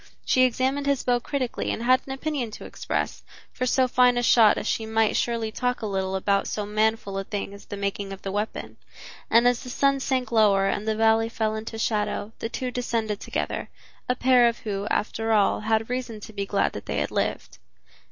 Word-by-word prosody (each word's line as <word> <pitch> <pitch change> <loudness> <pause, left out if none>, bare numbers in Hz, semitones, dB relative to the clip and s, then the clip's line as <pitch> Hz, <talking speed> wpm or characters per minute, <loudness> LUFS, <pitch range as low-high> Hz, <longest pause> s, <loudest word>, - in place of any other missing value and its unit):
She 255 0 +4
examined 265 +3 0
his 280 -2 +1
bow 245 -1 +2
critically 255 0 -3
and 230 - -2
had 255 +1 +4
an - - -5
opinion 270 -3 -2
to - - -10
express, - - -3 0.3
for 255 - -2
so 260 +1 +3
fine 250 0 +4
a 245 - +1
shot 225 -3 +6
as - - -3
she 220 - -1
might 220 -1 +2
surely 230 -2 -1
talk 250 +1 -2
a - - 0
little 190 -2 -2
about 200 +1 +1
so 210 - -3
manful 215 -1 0
a - - -3
thing 200 0 -5
as 200 - -12
the 205 - -7
making 200 0 -3
of 195 - -9
the 195 - -3
weapon. 210 +2 -4 0.5
And 235 +2 +5
as 245 -1 +2
the 250 - -8
sun 275 +2 +2
sank 260 -2 -1
lower 205 -4 +4
and 205 +2 -1
the 220 - +1
valley 225 +1 +3
fell 220 -1 -1
into 220 +1 -5
shadow, 210 -1 -1
the 225 - -3
two 250 +1 -3
descended 230 -4 -2
together, - - -3 0.4
a 250 - +2
pair 250 -2 +5
who, 205 -2 -3
after 225 +1 0
all, 205 -2 +3
had 220 +1 0
reason 245 -3 -4
to 220 - -10
be 200 -1 -3
glad 200 - +1
that - - -8
they - - -2
had - - -1
lived. - - -2
225 Hz, 210 wpm, -25 LUFS, 210-250 Hz, 0.5 s, shot